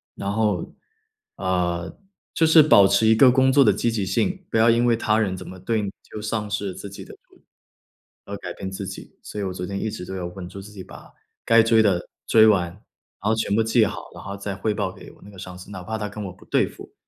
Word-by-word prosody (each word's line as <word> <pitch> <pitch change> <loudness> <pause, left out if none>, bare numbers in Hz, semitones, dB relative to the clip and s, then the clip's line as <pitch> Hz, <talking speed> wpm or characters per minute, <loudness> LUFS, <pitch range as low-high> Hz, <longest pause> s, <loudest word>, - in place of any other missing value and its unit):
然 100 - -3
后， 105 -4 -1 0.6
呃， 90 -3 -2 0.4
就 165 - +3
是 160 -1 +8
保 100 -10 +6
持 110 - +2
一 110 0 +5
个 125 +3 +7
工 130 +1 +4
作 140 0 +6
的 105 - +5
积 110 +4 0
极 110 -3 -1
性， 185 - -1
不 - - 0
要 110 +1 +5
因 120 +1 +2
为 120 -1 +3
他 110 -1 +1
人 95 -4 -1
怎 - - -9
么 95 - -10
对 110 +4 -1
你 100 - -4 0.2
就 - - -6
丧 105 -1 -3
失 100 -1 -2
了 95 - -6
自 100 - -8
己 100 - -10
的 - - -12 0.2
主 - - -25 0.8
而 - - -6
改 - - -7
变 95 - -6
自 95 0 -6
己。 95 - -9
所 105 - -8
以 - - -2
我 95 -1 -3
昨 90 0 -5
天 100 +1 -4
一 110 - -2
直 - - -7
都 95 - -6
有 90 -2 -4
稳 90 0 -9
住 100 - -9
自 105 - -12
己， 100 -3 -9
把 - - -14 0.3
该 115 0 +6
追 115 0 +4
的 95 -5 +2 0.2
追 110 -1 +6
完。 90 -5 +2
然 100 +2 -9
后 110 - +3
全 110 -2 0
部 115 - +3
记 115 0 +3
好， 105 - -6
然 - - -10
后 100 - -6
再 100 0 -5
汇 105 +2 -1
报 - - -2
给 - - -13
我 - - -22
那 100 - -13
个 95 - -13
上 90 0 -8
司， 90 +3 -12
哪 95 -2 -7
怕 110 +5 -4
他 105 -1 -4
跟 105 +1 -8
我 - - -5
不 90 - -19
对 - - +1
付， - - -13
105 Hz, 290 characters per minute, -23 LUFS, 95-110 Hz, 0.8 s, 是